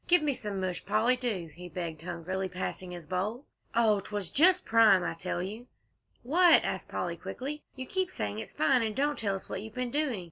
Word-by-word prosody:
"Give 355 Hz, -2 st, +5 dB
me 290 Hz, -2 st, +2 dB
some 210 Hz, -6 st, -4 dB
mush, 185 Hz, -1 st, -2 dB
Polly, 235 Hz, +4 st, +3 dB
do!" 210 Hz, -10 st, -3 dB
he 180 Hz, +2 st, -9 dB
begged 165 Hz, -2 st, -5 dB
hungrily, 185 Hz, +2 st, -3 dB
passing 185 Hz, 0 st, -4 dB
his 175 Hz, -2 st, -8 dB
bowl. 205 Hz, -, -2 dB, 0.3 s
"Oh, 220 Hz, -3 st, +4 dB
'twas 200 Hz, -2 st, -4 dB
just 360 Hz, +5 st, +5 dB
prime, 220 Hz, -5 st, +6 dB
I -, -, -1 dB
tell 175 Hz, +1 st, -3 dB
you!" 215 Hz, +6 st, -6 dB, 0.6 s
"What?" 335 Hz, +6 st, +6 dB
asked -, -, -3 dB
Polly, -, -, -2 dB
quickly. 295 Hz, +4 st, -5 dB
"You 260 Hz, -1 st, -5 dB
keep 375 Hz, +5 st, -1 dB
saying 105 Hz, 0 st, -3 dB
it's -, -, -7 dB
fine, 155 Hz, +11 st, +3 dB
and 220 Hz, -2 st, -1 dB
don't 290 Hz, +3 st, 0 dB
tell 200 Hz, -3 st, 0 dB
us 195 Hz, -, -7 dB
what -, -, -4 dB
you've 220 Hz, +1 st, -9 dB
been 250 Hz, -1 st, -2 dB
doing. 290 Hz, -7 st, 0 dB
210 Hz, 210 wpm, -30 LUFS, 180-255 Hz, 0.6 s, prime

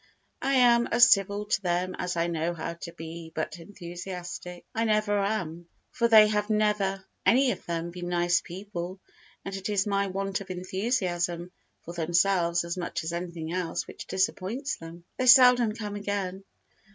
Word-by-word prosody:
I 275 Hz, -, +1 dB
am 240 Hz, -2 st, +5 dB
as 240 Hz, 0 st, +6 dB
civil 200 Hz, +1 st, +2 dB
to 205 Hz, -2 st, 0 dB
them 180 Hz, 0 st, -1 dB
as 180 Hz, -1 st, -2 dB
I 170 Hz, -, +2 dB
know 170 Hz, 0 st, -1 dB
how 165 Hz, +1 st, -4 dB
to 170 Hz, 0 st, -9 dB
be 165 Hz, 0 st, -9 dB
but 160 Hz, +1 st, -3 dB
enthusiastic 175 Hz, 0 st, -8 dB
I 225 Hz, -, 0 dB
never 215 Hz, -1 st, +2 dB
am, 175 Hz, -5 st, -2 dB, 0.2 s
for 235 Hz, -2 st, +1 dB
they 215 Hz, -2 st, +8 dB
have 210 Hz, 0 st, -1 dB
never 210 Hz, -3 st, +1 dB, 0.2 s
any 260 Hz, +1 st, +4 dB
of -, -, -6 dB
them 170 Hz, 0 st, -3 dB
been 175 Hz, 0 st, -6 dB
nice 175 Hz, 0 st, +2 dB
people, 185 Hz, 0 st, -7 dB, 0.5 s
and 195 Hz, -, -4 dB
it 195 Hz, +2 st, -4 dB
is 200 Hz, -2 st, +1 dB
my 200 Hz, -1 st, +1 dB
want 195 Hz, +1 st, -2 dB
of 195 Hz, -, -10 dB
enthusiasm 180 Hz, -2 st, -2 dB, 0.3 s
for 170 Hz, -, -7 dB
themselves 170 Hz, +1 st, +2 dB
as 170 Hz, +1 st, -4 dB
much 175 Hz, -, -3 dB
as 160 Hz, +1 st, -4 dB
anything 170 Hz, -2 st, -5 dB
else 180 Hz, -2 st, -2 dB
which -, -, -10 dB
disappoints 200 Hz, +8 st, -1 dB
them. 165 Hz, +1 st, -11 dB
They 255 Hz, -, 0 dB
seldom 250 Hz, -3 st, +7 dB
come 210 Hz, -2 st, -5 dB
again. 200 Hz, -2 st, -3 dB
185 Hz, 170 wpm, -27 LUFS, 175-210 Hz, 0.5 s, they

